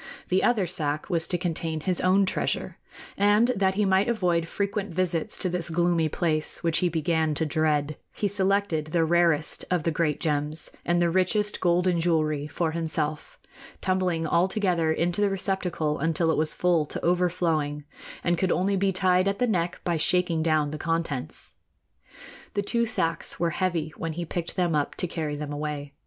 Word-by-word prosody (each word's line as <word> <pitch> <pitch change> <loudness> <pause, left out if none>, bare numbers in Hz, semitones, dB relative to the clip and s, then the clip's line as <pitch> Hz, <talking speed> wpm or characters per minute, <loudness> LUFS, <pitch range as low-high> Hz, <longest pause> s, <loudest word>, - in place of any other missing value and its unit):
The 185 +1 +2
other 220 -6 +2
sack 155 -1 -2
was 165 -2 +1
to 175 - 0
contain 165 -2 -2
his 180 +1 +1
own 190 +2 +4
treasure, - - -2 0.4
and 205 +4 +4
that 195 -5 +1
he 210 +1 +2
might 190 +3 +2
avoid 175 -7 +1
frequent 200 +1 -2
visits 170 -2 -1
to - - 0
this 175 -2 0
gloomy 170 -1 +1
place, 155 0 0
which 165 -1 +2
he 180 - +2
began 160 -1 0
to 160 - 0
dread, 150 -1 0
he 205 - -1
selected 195 -5 0
the 165 +1 +1
rarest 165 -2 +2
of 180 -4 0
the 165 - +1
great 155 -1 0
gems 150 0 -1
and 175 0 +1
the 170 -1 +2
richest 195 +4 +1
golden 175 0 +2
jewelry 155 -3 0
for 160 +2 -1
himself, 155 -2 -2 0.4
tumbling 185 -3 0
all 170 +3 +2
together 180 -6 +1
into 175 +4 0
the 205 - +3
receptacle 185 -5 -2
until 165 +2 +1
it - - +1
was 155 0 +1
full 175 -3 +2
to - - -5
overflowing 170 -4 0 0.4
and 175 -1 +1
could 185 -2 +1
only 195 +3 +1
be 195 0 +1
tied 185 0 +2
at 200 0 0
the 250 - +2
neck 175 -6 -1
by 170 -2 0
shaking 170 0 +2
down 155 -2 +1
the 155 - -6
contents. 165 -5 -3 1.0
The 205 - 0
two 235 +3 0
sacks 165 -6 -1
were 170 0 +1
heavy 165 -3 -1
when 165 -1 -4
he 170 +2 -4
picked 170 +1 -4
them 175 -3 +1
up 145 -1 -1
to - - -2
carry 160 -4 -3
them 145 0 -5
away. 145 -1 -4
170 Hz, 180 wpm, -26 LUFS, 155-185 Hz, 1.0 s, own